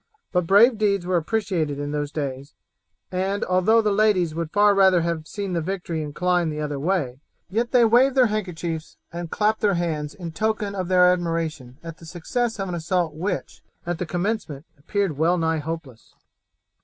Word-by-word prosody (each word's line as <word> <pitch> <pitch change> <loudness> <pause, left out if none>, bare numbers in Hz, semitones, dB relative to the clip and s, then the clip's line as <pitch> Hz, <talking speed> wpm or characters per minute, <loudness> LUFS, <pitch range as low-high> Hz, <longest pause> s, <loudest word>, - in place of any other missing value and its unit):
But 180 -2 0
brave 215 +4 +6
deeds 200 -4 +1
were 180 0 0
appreciated 170 -5 -1
in 145 0 -4
those 145 -1 -2
days, 140 -2 -5 0.6
and 190 +2 -1
although 195 +5 +3
the 210 - +2
ladies 200 -5 +2
would 165 0 -3
far 205 +3 +4
rather 190 -3 +5
have 165 -2 -2
seen 200 -3 -4
the 170 - 0
victory 175 -2 -3
incline 175 +3 0
the 150 0 -4
other 150 -2 -3
way, 145 -6 -1 0.3
yet 230 +4 0
they 245 -2 +5
waved 250 +4 +4
their 255 -2 +6
handkerchiefs 175 -7 -4 0.2
and 170 -1 -5
clapped 215 +4 0
their 205 -3 +2
hands 155 -4 -2
in 170 -3 -7
token 215 +2 -1
of 185 -3 -3
their 180 -1 +5
admiration 165 -7 -3
at 165 -1 -9
the 165 - -12
success 225 +8 -2
of 195 - -2
an 180 - -4
assault 170 -1 -1
which, 180 +7 -4 0.2
at 175 -1 -3
the 180 - -3
commencement, 175 -5 -3
appeared 165 +1 -2
well 170 +3 +3
nigh 160 -1 0
hopeless. 150 -6 -7
175 Hz, 180 wpm, -23 LUFS, 160-200 Hz, 0.6 s, brave